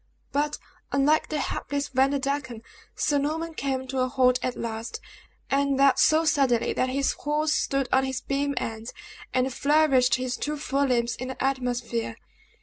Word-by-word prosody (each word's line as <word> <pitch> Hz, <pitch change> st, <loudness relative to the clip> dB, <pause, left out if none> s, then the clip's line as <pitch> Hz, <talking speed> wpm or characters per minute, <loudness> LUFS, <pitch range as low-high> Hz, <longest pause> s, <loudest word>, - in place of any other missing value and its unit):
But, 295 Hz, +1 st, 0 dB, 0.3 s
unlike 285 Hz, +3 st, +2 dB
the 310 Hz, -, -1 dB
hapless 285 Hz, +1 st, -3 dB
Vanderdecken, 270 Hz, -2 st, 0 dB, 0.3 s
Sir 290 Hz, -1 st, +1 dB
Norman 320 Hz, +3 st, -2 dB
came 270 Hz, -3 st, -2 dB
to 260 Hz, 0 st, -3 dB
a 255 Hz, -, +2 dB
halt 255 Hz, -1 st, +3 dB
at 255 Hz, -, -2 dB
last, 225 Hz, 0 st, -5 dB, 0.5 s
and 275 Hz, 0 st, +2 dB
that 275 Hz, -1 st, +4 dB
so 315 Hz, +1 st, +4 dB
suddenly 270 Hz, -6 st, +2 dB
that 255 Hz, -, 0 dB
his 275 Hz, +1 st, +1 dB
horse 300 Hz, +1 st, 0 dB
stood 275 Hz, -3 st, 0 dB
on 265 Hz, 0 st, +4 dB
his 265 Hz, 0 st, -2 dB
beam 280 Hz, +1 st, -1 dB
ends, 225 Hz, +1 st, -4 dB, 0.4 s
and 255 Hz, 0 st, 0 dB
flourished 280 Hz, -3 st, +3 dB
his 255 Hz, -1 st, -3 dB
two 300 Hz, 0 st, -3 dB
fore 280 Hz, -1 st, 0 dB
limbs 235 Hz, -2 st, +1 dB
in 255 Hz, -, -5 dB
the 260 Hz, -, -5 dB
atmosphere. 245 Hz, -, -1 dB
270 Hz, 160 wpm, -26 LUFS, 255-285 Hz, 0.5 s, that